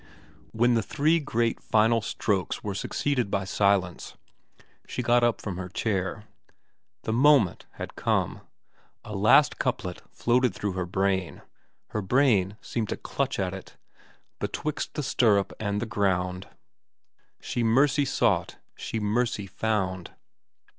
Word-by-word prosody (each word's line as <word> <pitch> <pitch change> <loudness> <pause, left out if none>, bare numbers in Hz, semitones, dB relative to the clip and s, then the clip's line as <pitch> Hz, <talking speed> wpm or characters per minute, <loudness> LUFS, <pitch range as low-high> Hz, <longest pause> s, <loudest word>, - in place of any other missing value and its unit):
When 120 +2 +3
the 115 - +2
three 155 +9 +2
great 115 -5 -1
final 110 +1 +3
strokes 100 -2 -2
were 100 - -3
succeeded 125 +3 -1
by 100 -1 0
silence, 100 -2 0 0.7
she 125 - -3
got 120 0 +3
up 120 -1 +2
from 100 -4 -5
her 90 0 -5
chair. 95 +1 -2 0.8
The 110 - -2
moment 130 - +4
had - - -7
come. - - 0 0.6
A - - -7
last - - +5
couplet 90 -1 -2
floated 120 -3 +1
through 105 - -2
her 90 -1 -3
brain, 95 -1 -1 0.5
her 105 - -2
brain 105 -3 +2
seemed 115 -3 -3
to - - -2
clutch 140 -1 -2
at 95 -2 -1
it: 95 - -10 0.6
Betwixt 155 -1 -3
the 150 - -2
stirrup 110 -7 +2
and 105 -1 -1
the 120 - -2
ground 90 -3 -1 0.9
She 120 - -3
mercy 135 +5 +3
sought, 105 -9 +1 0.2
she 115 - -4
mercy 105 0 0
found. 95 -3 -2
105 Hz, 135 wpm, -27 LUFS, 95-120 Hz, 0.9 s, last